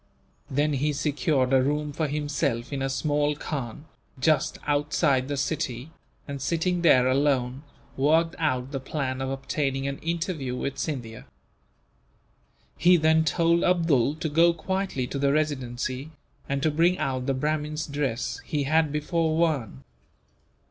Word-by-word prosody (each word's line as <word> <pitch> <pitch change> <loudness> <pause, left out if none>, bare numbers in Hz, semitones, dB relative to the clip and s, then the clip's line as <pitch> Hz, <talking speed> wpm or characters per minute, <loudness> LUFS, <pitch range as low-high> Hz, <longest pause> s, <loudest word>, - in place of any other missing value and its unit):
Then 145 +3 +1
he 145 +2 0
secured 140 -2 0
a 130 - +6
room 150 +2 -1
for 155 +1 -1
himself 140 -4 -2
in 135 - -2
a 135 - 0
small 145 +1 0
khan, 145 -2 -5 0.3
just 155 +3 +2
outside 145 -2 +1
the 145 0 -3
city 135 -1 -2 0.4
and, 140 -1 -5
sitting 170 +4 0
there 130 -7 +5
alone, 130 -1 +1 0.3
worked 160 +5 +3
out 130 -4 0
the 135 - -3
plan 130 -1 -3
of 135 - -2
obtaining 135 0 -2
an 140 0 -4
interview 165 -6 -2
with 140 +2 -4
Scindia. 120 -8 -4 1.5
He 175 +1 +6
then 160 0 +4
told 170 +2 +2
Abdool 160 -7 +2
to 160 +1 -3
go 165 +3 +4
quietly 190 -5 -2
to 140 - -4
the 140 0 +2
Residency, 135 -2 -2 0.4
and 140 0 -1
to 155 - +3
bring 170 +4 +3
out 130 -3 -2
the 135 - +1
Brahmin's 150 +2 -1
dress 140 -5 -2
he 150 -3 -1
had 155 +1 +2
before 160 +1 0
worn. 135 - 0
145 Hz, 145 wpm, -26 LUFS, 135-160 Hz, 1.5 s, a